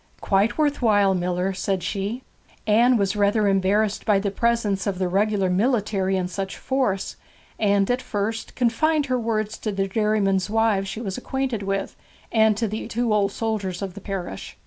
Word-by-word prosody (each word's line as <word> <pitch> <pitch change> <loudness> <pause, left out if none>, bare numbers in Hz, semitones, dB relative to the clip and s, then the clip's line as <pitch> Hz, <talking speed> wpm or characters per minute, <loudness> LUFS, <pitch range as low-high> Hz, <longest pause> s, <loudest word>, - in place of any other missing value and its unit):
'Quite 200 +3 +1
worth 295 -3 +1
while, 205 -4 +4
miller,' 180 +1 -1
said 190 -1 -2
she. 205 +7 -3 0.4
Anne 235 +4 +4
was 200 -1 0
rather 205 +1 +2
embarrassed 200 +2 +1
by 210 -2 +3
the 200 0 -1
presence 215 -3 0
of 195 -2 -1
the 185 0 0
regular 200 +1 +1
military 195 -1 +1
in 180 -1 -1
such 190 +1 -5
force, 255 -8 -1 0.4
and 200 -2 +3
at 250 +1 0
first 220 0 -3
confined 290 +5 +2
her 255 -2 0
words 215 -2 -2
to 215 - -2
the 195 -1 -1
dairymen's 200 -2 +1
wives 220 -3 +1
she 215 +4 -5
was 195 -1 -4
acquainted 260 -4 -2
with, 195 0 -3 0.4
and 220 -2 +4
to 225 0 0
the 215 +2 -4
two 235 -1 0
old 200 -1 +2
soldiers 205 -4 -3
of 190 -2 -5
the 200 - -10
parish. 185 - -6
205 Hz, 175 wpm, -23 LUFS, 195-225 Hz, 0.4 s, while